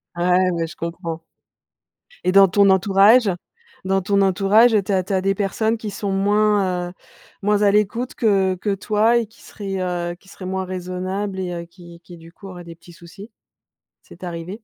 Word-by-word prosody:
Ouais, 180 +1 +2
ouais, 165 -1 -2
je 170 - -12
comprends. 165 -1 -6 1.0
Et 185 - +2
dans 195 0 +7
ton 200 +2 +3
entourage 195 +4 +5 0.6
dans 195 0 +1
ton 200 +2 +1
entourage, 200 +5 +4
tu - - -3
as 185 -1 +1
tu 195 - -4
as 190 - +1
des 195 +1 +1
personnes 220 +3 -1
qui 215 -1 -6
sont 200 0 -4
moins, 195 -2 +1
heu 175 - -13 0.5
moins 210 +1 +1
à 205 -1 +4
l'écoute 210 +4 0
que 195 -4 +1
que 195 +2 -2
toi 215 +4 +1
et 235 - 0
qui 220 - -23
seraient, 195 -2 -6
heu 175 -1 -3
qui 190 - -26
seraient 185 - -10
moins 190 0 -3
raisonnables 185 +2 -4
et 180 -1 -3
heu, 170 - -5
qui 170 -1 -15
qui 175 -1 -13
du 165 +1 -16
coup, 200 - -13
auraient 175 -1 -10
des 170 - -10
petits 175 +1 -17
soucis? 195 +6 -13 0.7
C'est - - -16
arrivé? 170 0 -6
190 Hz, 195 wpm, -21 LUFS, 180-205 Hz, 1.0 s, dans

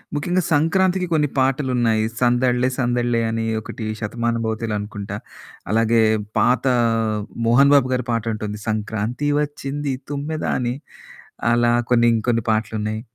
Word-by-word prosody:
ముఖ్యంగా 175 +5 0
సంక్రాంతికి 180 +4 +2
కొన్ని 150 -3 +2
పాటలున్నాయి. 125 -5 +1
'సందళ్ళే 125 0 +2
సందళ్ళే' 120 -2 +1
అని 115 0 -2 0.2
ఒకటి 110 +1 -7
'శతమానభవతిలో' 115 0 -2
అనుకుంటా. 100 -1 -6 0.5
అలాగే 115 +1 +3 0.4
పాత 125 -1 +2 0.8
'మోహన్ 135 +5 +5
బాబు 135 -3 +4
గారి' 125 -1 -1
పాటుంటుంది. 110 -2 -3
'సంక్రాంతి 110 +6 -2
వచ్చింది 145 -1 -3 0.2
తుమ్మెద' 145 +2 -3
అని 125 0 -1 0.8
అలా 120 0 +3 0.2
కొన్ని 120 -1 +5
ఇంకొన్ని 115 0 0
పాటలున్నాయి. 110 0 -2
120 Hz, 110 wpm, -21 LUFS, 110-135 Hz, 0.8 s, మోహన్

